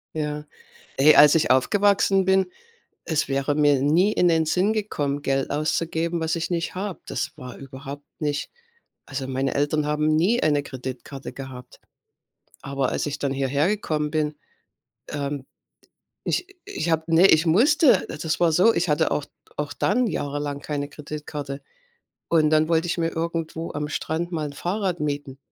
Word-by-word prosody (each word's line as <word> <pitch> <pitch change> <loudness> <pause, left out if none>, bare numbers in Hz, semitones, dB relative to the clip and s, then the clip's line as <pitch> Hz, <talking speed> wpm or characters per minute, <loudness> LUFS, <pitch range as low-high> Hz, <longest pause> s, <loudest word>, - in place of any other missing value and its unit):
Ja, 150 -1 -3 0.5
ey, 150 +3 +7
als 150 +1 +8
ich 165 - +2
aufgewachsen 195 +7 +3
bin, 190 0 +3 0.6
es 155 -3 0
wäre 140 +1 0
mir 145 -2 +3
nie 175 +9 +3
in 175 - +3
den 160 -1 +3
Sinn 185 +6 +2
gekommen, 145 -10 -2
Geld 135 -1 0
auszugeben, 165 +3 -1
was 160 +1 0
ich 165 +1 -3
nicht 170 0 -2
habe. 195 0 -4
Das 140 - -3
war 125 -1 -9
überhaupt 135 +1 -9
nicht 145 -2 -2 0.6
also, 135 -1 -4
meine 135 +1 -1
Eltern 145 +1 +1
haben 150 +1 +1
nie 190 +10 +2
eine 145 -2 +2
Kreditkarte 130 +1 -7
gehabt. 130 -2 -10 0.8
Aber 135 -1 -1
als - - -1
ich 145 0 -3
dann 140 - -1
hierhergekommen 150 +3 0
bin, 150 -1 -1 0.7
ähm, 140 -2 -4 0.8
ich 360 - -1 0.2
ich 395 - -3
habe 160 0 +1
ne, 165 +3 +5
ich 160 0 +4
musste 260 - +4
äh, - - -5
das 160 +1 -2
war 170 -2 +4
so, 185 +8 +5
ich 175 -3 0
hatte 150 - +2
auch 150 - 0 0.3
auch 145 -1 -3
dann 250 -1 +1
jahrelang 145 -3 -3
keine 145 -1 -3
Kreditkarte. 145 -2 -7 0.7
Und 155 -2 +4
dann 155 +1 +3
wollte 165 0 +2
ich 175 - -1
mir 165 -1 +1
irgendwo 165 0 -3
am 150 0 -3
Strand 165 +3 -3
mal 155 -3 -2
'n 145 - -8
Fahrrad 180 +2 -2
mieten. 145 -2 -3
150 Hz, 160 wpm, -24 LUFS, 145-170 Hz, 0.8 s, als